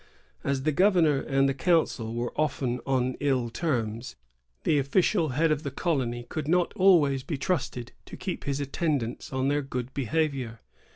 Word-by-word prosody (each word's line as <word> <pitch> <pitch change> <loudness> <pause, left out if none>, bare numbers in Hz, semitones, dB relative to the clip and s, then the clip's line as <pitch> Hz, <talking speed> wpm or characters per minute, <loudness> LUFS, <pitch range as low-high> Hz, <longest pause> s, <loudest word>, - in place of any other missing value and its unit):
"^ - - -28 0.4
As 135 -1 -1
the 155 - +2
governor 170 -4 +4
and 135 0 +2
the 135 - +1
council 135 -7 +1
were 120 0 -2
often 135 -5 -1
on 130 -1 +1
ill 130 -5 0
terms, 115 -6 -2 0.5
the 150 - +3
official 160 +4 +2
head 165 0 +3
of 150 -1 +1
the 140 - -3
colony 130 -6 -1
could 155 -2 -4
not 175 +1 +2
always 160 -8 +4
be 145 +2 -4
trusted 130 -6 -2 0.2
to - - -9
keep 185 0 -5
his 140 0 -1
attendants 140 -4 -2
on 130 0 0
their 145 +1 +1
good 130 -2 -5
behavior. 135 -4 -1
140 Hz, 170 wpm, -27 LUFS, 125-160 Hz, 0.5 s, governor